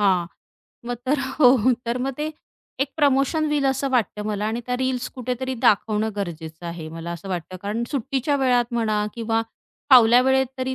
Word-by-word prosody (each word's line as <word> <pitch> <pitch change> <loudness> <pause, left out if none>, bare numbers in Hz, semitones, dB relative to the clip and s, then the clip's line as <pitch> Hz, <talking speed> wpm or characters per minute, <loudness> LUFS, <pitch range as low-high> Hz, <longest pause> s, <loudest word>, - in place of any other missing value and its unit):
हां, 185 -4 +3 0.6
मग 245 - -1
तर 285 +3 +2 0.2
हो 255 -3 +7 0.3
तर 235 - 0
मग 265 +2 -1
ते 305 +1 -2 0.5
एक 275 - +1
प्रमोशन 285 +1 +2
होईल 295 -2 0
असं 270 +1 0
वाटतं 225 -4 0
मला 210 -1 -2
आणि 225 +2 -2
त्या 250 0 -1
रील्स 255 -1 -1
कुठेतरी 255 +1 -3
दाखवणं 215 +1 +2
गरजेचं 165 -3 -6
आहे 170 -2 -6
मला 165 +1 -6
असं 170 +3 -8
वाटतं 185 0 -4
कारण 210 +3 -2
सुट्टीच्या 275 +1 -1
वेळात 245 -2 +2
म्हणा 215 -2 +1
किंवा 225 -1 0 0.5
फावल्या 245 -2 +8
वेळेत 265 0 +3
तरी 260 0 -2
240 Hz, 175 wpm, -23 LUFS, 205-265 Hz, 0.6 s, फावल्या